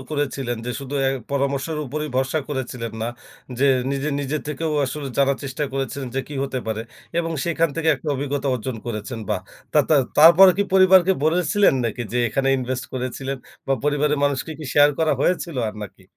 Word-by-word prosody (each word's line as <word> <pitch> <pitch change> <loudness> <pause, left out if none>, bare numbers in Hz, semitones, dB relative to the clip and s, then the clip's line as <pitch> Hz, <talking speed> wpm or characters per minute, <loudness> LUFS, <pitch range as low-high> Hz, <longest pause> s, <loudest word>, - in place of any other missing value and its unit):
করেছিলেন 135 -4 -2
যে - - -1
শুধু 140 +1 -6
অ্যা 135 - +2 0.2
পরামর্শের 140 +2 -1
উপরই 150 +4 -4
ভরসা 135 +4 +1
করেছিলেন 125 -5 -4
না 115 - -1 0.5
যে, 140 - +3 0.2
নিজে, 140 +1 -1
নিজে 145 +2 -2
থেকেও 155 +2 -2
আসলে 140 +2 -5
জানার 140 0 +3
চেষ্টা 135 +2 -3
করেছিলেন 135 0 -3
যে, - - +2
কি 145 - -7
হতে 135 -1 -3
পারে 110 0 -2 0.4
এবং 165 -1 -1
সেখান 165 -1 +1
থেকে 165 -1 0
একটা 150 - -7
অভিজ্ঞতা 140 +1 -2
অর্জন 125 0 -4
করেছেন 115 +1 -4
বা - - +1 0.4
তা - - +4
তা 155 - +6 0.2
তারপর 170 +5 +9
কি 200 - +2
পরিবারকে 190 -1 +6
বলেছিলেন 175 +3 +3
নাকি 115 +1 -2
যে, 125 - 0
এখানে 135 +5 0
ইনভেস্ট 130 0 -3
করেছিলেন? 130 +2 -3 0.3
বা 135 - +1
পরিবারের 150 0 +1
মানুষকে 145 +3 -1
কি 155 - -7
শেয়ার 145 0 +6
করা 160 -2 +2
হয়েছিল 170 -1 0
আর 105 - -7
নাকি? 100 - -14
140 Hz, 180 wpm, -22 LUFS, 130-155 Hz, 0.5 s, তারপর